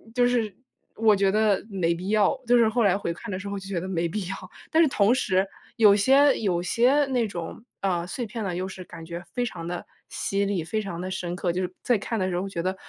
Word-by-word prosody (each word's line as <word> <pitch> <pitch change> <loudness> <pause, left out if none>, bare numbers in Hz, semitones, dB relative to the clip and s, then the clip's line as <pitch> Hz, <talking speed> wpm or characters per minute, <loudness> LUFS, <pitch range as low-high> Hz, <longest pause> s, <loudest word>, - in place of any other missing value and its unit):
就 245 -1 +4
是， 235 -4 +1 0.4
我 220 -1 +4
觉 195 -1 +2
得 210 -1 +2
没 180 -4 0
必 180 +3 -5
要， 210 +3 +3
就 245 +1 +5
是 230 -2 +5
后 240 +2 0
来 195 -2 +4
回 170 -4 -3
看 175 - -8
的 185 - -2
时 200 - -7
候 200 0 -3
就 195 - -10
觉 195 -3 -2
得 185 - -5
没 170 -2 -1
必 210 +5 -3
要， 190 - -3 0.4
但 320 - +5
是 320 - +5
同 210 -2 +3
时 195 -7 +1 0.3
有 210 -3 +6
些 270 +6 +5
有 185 -5 0
些 255 +10 +3
那 250 -4 +1
种 175 +2 -7 0.2
啊， 180 -3 0
碎 240 +6 -4
片 225 0 -5
呢， 185 -3 -2
又 185 +1 -2
是 185 -1 -8
感 165 -2 -11
觉 170 +1 -6
非 245 - 0
常 170 -7 -6
地 175 0 -4 0.2
犀 200 0 -1
利、 195 -4 -1
非 215 +7 -2
常 185 -5 -6
地 185 +1 -4
深 175 -2 -3
刻， 180 -1 -1
就 180 - -1
是 180 -1 -3
在 245 -3 +3
看 220 +2 -3
的 185 - 0
时 175 -1 -1
候 195 - -4
觉 170 -3 -3
得， 185 +1 -1
195 Hz, 280 characters per minute, -25 LUFS, 180-225 Hz, 0.4 s, 有